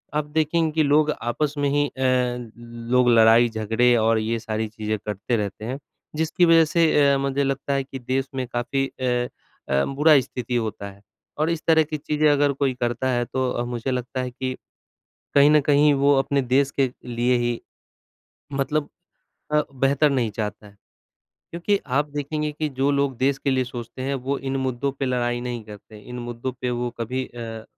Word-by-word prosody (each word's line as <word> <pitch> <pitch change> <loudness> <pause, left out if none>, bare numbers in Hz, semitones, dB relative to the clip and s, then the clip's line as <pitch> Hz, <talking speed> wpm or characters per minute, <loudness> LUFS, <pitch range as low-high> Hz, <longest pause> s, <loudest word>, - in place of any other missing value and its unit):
आप 150 -1 0
देखेंगे 160 +2 0
कि 155 0 +2
लोग 150 +1 +3
आपस 140 +5 -1
में 145 -1 +1
ही 145 +1 +2
अ, - - -12 1.0
लोग 125 -1 +4
लड़ाई-झगड़े 115 +1 +4
और 115 0 +3
ये 115 +1 -1
सारी 110 0 -3
चीज़ें 110 0 -3
करते 105 +3 -2
रहते 105 0 -4
हैं, 130 +4 -4 0.4
जिसकी 160 +3 +2
वज़ह 165 -1 +6
से 155 -2 +3
अ, - - +2
मुझे 140 +1 0
लगता 135 +1 -1
है 135 0 0
कि 135 0 -8
देश 130 +2 -1
में 130 -1 -2
काफ़ी 125 +3 -1
अ 130 - -11 0.7
अ, 70 0 +2
बुरा 150 +2 +5
स्थिति 125 0 -5
होता 110 -3 -3
है 100 +1 -19 0.4
और 155 +2 +1
इस 165 -1 -1
तरह 160 -1 +5
की 155 0 -4
चीज़ें 150 +1 +1
अगर 145 0 +3
कोई 135 -1 0
करता 120 +1 -1
है 120 -1 0
तो 130 +1 -1
अ, 120 - -2
मुझे 120 +1 -3
लगता 125 0 -3
है 125 0 -4
कि, 130 +1 -4 0.8
कहीं 145 +1 +6
न 150 0 +6
कहीं 145 +1 +4
वो 140 +1 +4
अपने 140 +1 +1
देश 135 +2 +2
के 130 -2 +3
लिए 125 +1 +1
ही 120 -1 -1 1.0
मतलब 145 +2 0 0.6
अ, 150 0 +4
बेहतर 140 +3 +2
नहीं 125 -5 0
चाहता 105 0 -5
है। 100 - -17 0.8
क्योंकि 175 +4 0
आप 145 +3 0
देखेंगे 150 +1 -2
कि 155 +1 -2
जो 135 0 0
लोग 140 -2 0
देश 135 +1 +1
के 140 - -1
लिए 130 -1 +1
सोचते 120 +1 -7
हैं 135 +1 -1
वो 140 0 0
इन 135 0 -3
मुद्दों 130 +1 -1
पे 135 - -1
लड़ाई 120 -1 0
नहीं 120 -1 -4
करते 105 0 -12
इन 125 +4 -9
मुद्दों 120 +1 -5
पे 125 - -1
वो 120 - -2
कभी 130 +3 -2
अ, 115 -2 -8
130 Hz, 190 wpm, -23 LUFS, 120-145 Hz, 1.0 s, वज़ह